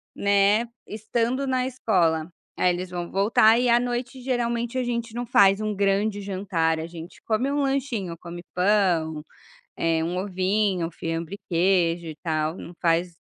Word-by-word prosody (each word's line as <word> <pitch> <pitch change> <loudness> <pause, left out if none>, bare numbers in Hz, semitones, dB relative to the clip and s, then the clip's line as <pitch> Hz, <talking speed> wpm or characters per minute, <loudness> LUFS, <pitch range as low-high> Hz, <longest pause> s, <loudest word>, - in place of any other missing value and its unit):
né, 200 +3 +3 0.2
estando 235 +5 -1
na 255 -1 0
escola, 180 -10 +1 0.3
aí 180 - +3
eles 180 +1 -5
vão 175 -1 -5
voltar 220 +3 +4
e 250 - +1
à 235 0 +5
noite 245 +1 -3
geralmente 240 -1 -1
a 255 - +1
gente 235 -1 -3
não 240 +1 -3
faz 200 -3 +5
um 215 -1 -2
grande 200 +1 +1
jantar, 185 -5 -1
gente 170 0 -10
come 240 +5 0
um 290 - 0
lanchinho, 250 -11 -2
come 175 0 -8
pão, 180 -5 +2 0.6
eh, 165 -1 +1
um 175 +2 -2
ovinho, 190 -2 0
fiambre 165 +4 -4
e - - -35
queijo 170 -1 +2
e 155 - -7
tal, 155 -1 -1
não 175 - -9
faz, 170 +1 +1
195 Hz, 160 wpm, -25 LUFS, 170-235 Hz, 0.6 s, à